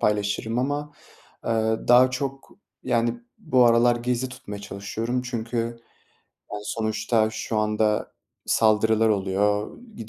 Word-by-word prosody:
paylaşırım 105 +2 0
ama, 145 +3 -2 0.5
eee, - - -2 0.4
daha 125 +1 +7
çok, 135 +1 -4 0.3
yani, 120 0 0 0.2
bu 125 -1 +3
aralar 120 +1 +5
gizli 125 +1 -1
tutmaya 105 -5 -8
çalışıyorum. 110 +5 -3
Çünkü, 120 -1 -4 1.0
yani, 105 0 -5
sonuçta 110 0 0
şu 110 0 -3
anda 105 0 0 0.3
saldırılar 110 0 +3
oluyor. 105 +1 0 0.2
Gi 110 - -9
115 Hz, 115 wpm, -24 LUFS, 105-125 Hz, 1.0 s, daha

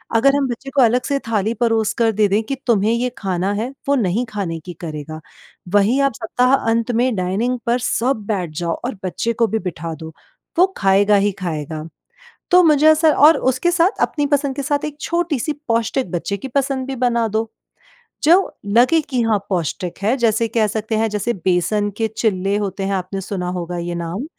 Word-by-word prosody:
अगर 275 +5 +4
हम 280 -2 +1
बच्चे 245 +3 -6
को 275 - +5
अलग 245 +1 +3
से 280 -1 0
थाली 220 0 0
परोस 225 -2 +1
कर 230 -1 +3
दे 210 0 +2
दें 200 +2 +1
कि 270 +5 -3
तुम्हें 215 -2 +3
ये 245 +2 0
खाना 190 -1 -1
है 220 +4 -2 0.2
वो 280 - +3
नहीं 225 0 0
खाने 190 -6 -4
की 180 - -7
करेगा, 155 -1 -7 0.5
वहीं 210 +7 +3
आप 275 -2 +2
सप्ताहांत 230 0 +1
में 240 +1 +1
डाइनिंग 210 +7 -1
पर 240 +1 +1
सब 245 -2 0
बैठ 185 -6 -1
जाओ 170 -1 -1
और 250 - -3
बच्चे 230 +5 -1
को 230 0 +1
भी 220 0 -1
बिठा 165 0 -6
दो, 160 +1 -10 0.4
वो 365 +2 +6
खाएगा 200 +1 +4
ही 200 +1 +2
खाएगा। 155 -3 -4 0.7
तो 360 0 +7
मुझे 305 -1 +4
ऐसा 315 0 +4 0.2
और 320 - +6
उसके 260 +7 +1
साथ 350 +4 +1
अपनी 290 -2 0
पसंद 280 -2 0
के 280 - -2
साथ 290 +1 -1
एक 295 -1 -5
छोटी-सी 325 -5 -1 0.2
पौष्टिक 230 -2 0
बच्चे 180 +3 -2
की 265 +7 -7
पसंद 270 0 -1
भी 270 -1 -4
बना 235 -2 +1
दो 220 +1 -2 0.7
जो 315 - +5 0.3
लगे 245 +10 +4
कि 260 -5 -3
हाँ, 220 -2 +2
पौष्टिक 175 -1 -3
है 220 +6 +2
जैसे 230 -2 +1
कह 220 -1 +1
सकते 220 +1 -2
हैं 225 +1 +1
जैसे 210 +3 -1
बेसन 190 +3 0
के 225 - 0
चीले 195 -3 0
होते 200 -1 -3
हैं 195 - -1
आपने 190 +1 -3
सुना 180 -2 -4
होगा 175 -1 -4
ये 175 0 -4
नाम, 170 +8 -4
225 Hz, 195 wpm, -19 LUFS, 195-260 Hz, 0.7 s, तो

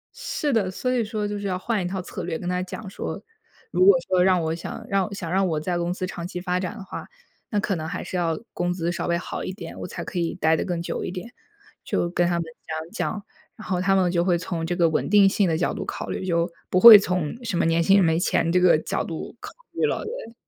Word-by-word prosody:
是 290 -2 -2
的， 205 -5 +2
所 250 +7 -2
以 250 -2 +1
说 210 -1 -3
就 205 0 -4
是 200 - -3
要 185 - -1
换 215 +2 -1
一 - - -3
套 190 +1 -3
策 180 0 -7
略 165 -2 -3
跟 175 - -6
他 180 0 0
讲 195 +3 -7
说： - - -5 0.5
“如 180 +1 +3
果 190 -1 +8
说 180 -1 +3
让 185 -2 +4
我 160 0 -1
想 165 - -7
让 195 -1 +1
我 210 - -8
想 175 -4 -5
让 190 +1 +2
我 155 -3 0
在 175 +3 -2
公 175 0 -1
司 185 +1 -3
长 175 -1 -6
期 180 - -5
发 180 0 -1
展 185 +4 -4
的 205 - -8
话， 190 - -8 0.4
那 210 - 0
可 200 -1 -1
能 160 -1 -4
还 - - -4
是 - - -6
要 170 -2 0
工 175 0 -1
资 175 -1 -1
稍 175 - -3
微 170 - +1
好 170 - -5
一 - - -3
点， 180 -3 -9
我 - - -5
才 - - -6
可 180 - -4
以 170 0 -1
待 160 -3 +3
得 - - -1
更 175 -2 -2
久 170 - -3
一 - - -3
点。” 195 +6 -7 0.5
就 175 - -1
跟 175 -1 +2
他 175 - +1
们 170 - 0 0.2
讲 160 +1 -5
讲， 210 -2 -3 0.3
然 220 -3 -11
后 180 -1 0
他 195 +1 +3
们 185 -2 +3
就 170 -1 +2
会 175 -2 +2
从 170 -2 -3
这 175 +2 -1
个 170 -2 +4
稳 160 - 0
定 205 -1 +6
性 195 -2 +2
的 160 - +1
角 175 - 0
度 - - -4
考 - - -5
虑， - - -3
就 170 -1 +1 0.2
不 180 - +3
会 225 0 +12
从 180 +4 -2
什 215 -6 -2
么 - - +2
年 165 0 +3
轻 195 +4 +5
人 190 - +5
没 160 0 +2
钱 165 -1 +1
这 180 - +4
个 180 -3 +5
角 155 - -2
度 165 +7 -6
考 - - -8 0.2
虑 - - -3
了， - - -1
对。 440 - -7
180 Hz, 300 characters per minute, -24 LUFS, 170-195 Hz, 0.5 s, 会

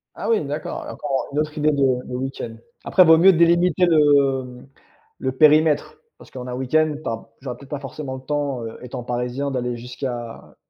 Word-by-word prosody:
Ah - - -4
oui, 225 -7 +2
d'accord, 145 +2 -5
encore, 135 -2 -3
heu, - - -14
une 145 - 0
autre 150 0 -2
idée 150 0 +2
de 135 -3 +1
de 125 - -6
week-end. 130 -3 -5 0.3
Après, 185 - +5
vaut 160 0 +7
mieux 185 +4 +7
délimiter 170 +1 +3
le, 145 -5 +4
mmh, 125 0 -12 0.5
le 130 - -1
périmètre, 150 +2 +3 0.2
parce - - -17
qu'en 125 -1 -7
un 125 - -5
week-end, 150 +5 +1
tu - - -3
as 115 0 -6
j'aurais 130 -2 -6
peut-être 140 - -15
pas 145 - -4
forcément 135 -1 -6
le 130 - -9
temps, 140 -3 -2
heu, 115 - -8
étant 125 -1 -6
parisien, 125 +3 -3
d'aller 125 -2 -2
jusqu'à 120 -1 -7
135 Hz, 200 wpm, -22 LUFS, 125-150 Hz, 0.5 s, vaut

